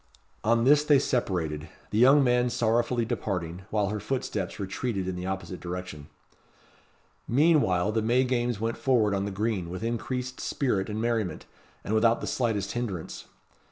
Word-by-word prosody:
On 115 +1 +3
this 145 +3 +5
they 150 -1 +5
separated: 80 - -1 0.2
the 105 - +1
young 135 +4 +7
man 125 -1 +3
sorrowfully 120 0 +1
departing, 95 -6 -3
while 105 -2 0
her 105 +1 -3
footsteps 105 -5 -3
retreated 100 0 -3
in 95 - -2
the 90 +1 -5
opposite 95 -1 -4
direction. 90 -4 -6 1.2
Meanwhile 120 - +3
the 110 +1 0
May 120 +4 +3
games 120 -3 0
went 115 +1 -2
forward 115 -6 +2
on 100 0 0
the - - -2
green 100 -3 -2
with 90 +4 -6
increased 125 +2 -3
spirit 105 -9 -1
and 105 +1 -3
merriment, 115 -4 -1 0.4
and 105 - -3
without 115 +1 +3
the - - -5
slightest 110 -6 -1
hinderance. 105 -9 -4
110 Hz, 160 wpm, -27 LUFS, 95-125 Hz, 1.2 s, young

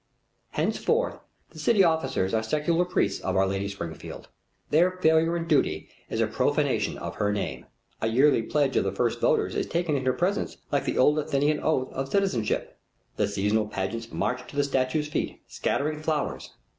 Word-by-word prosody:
Henceforth 480 +2 0 0.3
the - - -12
city 215 -5 +4
officers 135 - +1
are 110 - +2
secular 155 +9 +1
priests 105 - 0
of 95 - -1
Our 95 0 +4
Lady 95 +1 -1
Springfield. 85 -6 -7 0.4
Their 170 +4 +5
failure 160 0 +3
in 165 - -3
duty 140 - +1 0.2
is - - -2
a - - +4
profanation - - 0
of - - -6
her 105 0 +1
name. 105 -1 -3 0.3
A 110 - +1
yearly 130 +3 +4
pledge 140 +3 0
of - - +3
the 95 - -1
first 115 +4 0
voters - - +2
is - - -1
taken 170 -3 0
in 135 -2 -2
her 130 - +4
presence 185 +7 -1
like 140 - +1
the - - -1
old 150 +4 +4
Athenian 150 0 +1
oath 130 -5 0
of 135 0 -3
citizenship. 190 - 0 0.4
The - - +2
seasonal 105 +2 0
pageants 105 +3 -4
march 125 0 -2
to - - -12
the 145 - +2
statue's 140 +2 0
feet, 150 - -3
scattering 150 +1 -1
flowers. 155 -2 -2
140 Hz, 180 wpm, -26 LUFS, 110-160 Hz, 0.4 s, Their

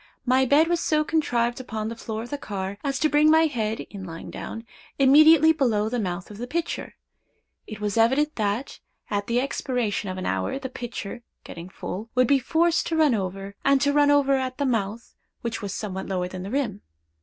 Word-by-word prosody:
My 260 +1 +3
bed 295 +5 +5
was 345 0 +1
so 305 -2 +1
contrived 245 -7 0
upon 220 -4 -4
the 230 - -5
floor 225 -1 -5
of 240 - -10
the 290 - -2
car, 195 -2 -5
as 275 -2 -1
to 310 - +4
bring 300 +1 +4
my 320 +1 +6
head, 225 -7 -2
in 200 -2 -9
lying 165 -2 -8
down, 225 +1 -7 0.3
immediately 310 +3 +7
below 225 -8 +1
the 245 +1 -2
mouth 180 -1 -4
of 210 - -10
the 245 - -4
pitcher. 330 +5 -3 0.7
It 215 -1 -8
was 210 0 -2
evident, 270 +7 +3
that, 215 +4 -2 0.3
at 205 -1 -1
the 235 +1 +1
expiration 250 -6 -2
of 185 - -5
an 185 - -4
hour, 95 - -1
the 270 -1 -5
pitcher, 240 -2 -6 0.2
getting 170 +2 -9
full, 205 +3 -6
would 255 0 +5
be 275 +2 +4
forced 335 +5 +1
to 325 - -1
run 305 -5 +4
over, 195 -1 -3
and 275 0 +4
to 285 0 +2
run 290 0 +4
over 285 -1 +4
at 260 -1 -1
the 285 - 0
mouth, 225 -2 -2 0.3
which 230 -1 -4
was 200 -2 -4
somewhat 190 -1 -5
lower 180 -2 -1
than 185 0 -7
the 190 - -6
rim. 230 -6 -2
240 Hz, 210 wpm, -25 LUFS, 205-285 Hz, 0.7 s, immediately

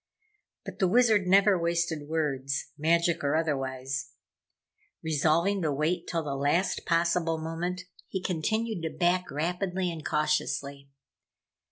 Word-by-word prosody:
But - - -8
the 190 - +3
Wizard 215 -2 +4
never 195 0 +5
wasted 170 -3 -1
words, 140 -4 -2
magic 170 +2 +1
or 140 +1 +1
otherwise. 135 -3 -2 0.9
Resolving 160 +5 +2
to 155 -3 0
wait 155 +5 -1
till 165 -2 -1
the 145 -2 -3
last 145 +7 0
possible 170 -1 +1
moment, 165 +3 -3 0.3
he 190 - -3
continued 200 +4 -1
to 165 - -2
back 180 +1 +1
rapidly 180 +4 -1
and 160 -2 -7
cautiously. 145 -2 -1
165 Hz, 125 wpm, -28 LUFS, 150-180 Hz, 0.9 s, never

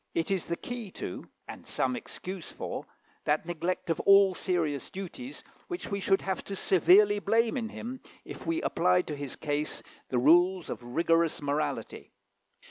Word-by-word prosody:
It 165 +3 0
is 190 -3 0
the 170 - -1
key 245 -4 -6
to, 90 - -6 0.2
and - - -9
some 130 -1 -1
excuse 185 +7 -7
for, - - -5 0.4
that 150 +2 +1
neglect 175 +1 -2
of - - -1
all 195 -1 +6
serious 165 -7 -1
duties 220 - -7 0.2
which 350 -1 -5
we 200 - -1
should 195 0 +2
have 190 - -2
to 200 - -4
severely 200 +3 +5
blame 225 +3 +2
in 230 -4 -2
him, 250 +3 -7 0.2
if - - -9
we 330 0 0
applied 180 +1 +2
to 150 - -2
his 140 -2 -5
case 150 0 -2 0.3
the 125 - 0
rules 175 +7 +4
of - - -5
rigorous 165 +6 +1
morality. 145 +1 -3
180 Hz, 165 wpm, -29 LUFS, 155-200 Hz, 0.4 s, all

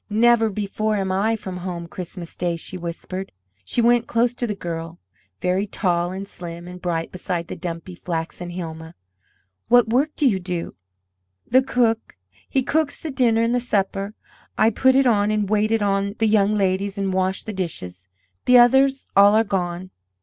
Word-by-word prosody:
"Never 225 +1 +4
before 215 +1 -2
am 190 -2 -1
I 210 +4 +1
from 190 -4 -6
home 175 -2 -5
Christmas 175 0 -8
day," 175 -1 -1
she 170 +3 -6
whispered. 185 +2 -6 0.3
She 235 - 0
went 240 0 +3
close 235 +1 +2
to 245 0 -3
the 210 - -2
girl, 165 -2 -5 0.4
very 185 +3 0
tall 175 -3 0
and 195 +1 -6
slim 170 -2 -8
and 180 0 -9
bright 165 -2 -2
beside 175 -2 -3
the - - -4
dumpy, 170 +1 -6
flaxen 175 0 -5
Hilma. 165 -2 -7 0.7
"What 245 -2 +5
work 265 +6 +2
do 290 - +3
you 200 -6 +2
do?" 180 -2 -4 0.7
"The 260 +2 +4
cook, 235 - 0 0.3
he 265 - +1
cooks 310 +2 0
the 315 - -5
dinner 230 -4 +2
and 230 +1 +1
the 245 - +2
supper; 200 -3 -1 0.4
I 225 - +4
put 260 +4 +3
it 270 0 +4
on 210 -4 +3
and 210 -1 0
wait 215 +1 +2
it 225 -1 +1
on 200 0 0
the 225 - +2
young 210 -1 +3
ladies 195 0 0
and 195 -1 -1
wash 190 0 0
the 220 - -6
dishes. 90 - -5 0.4
The 250 - +7
others 265 +3 +4
all 200 +1 +7
are 220 - +5
gone." 185 -3 -3
195 Hz, 180 wpm, -22 LUFS, 180-225 Hz, 0.7 s, The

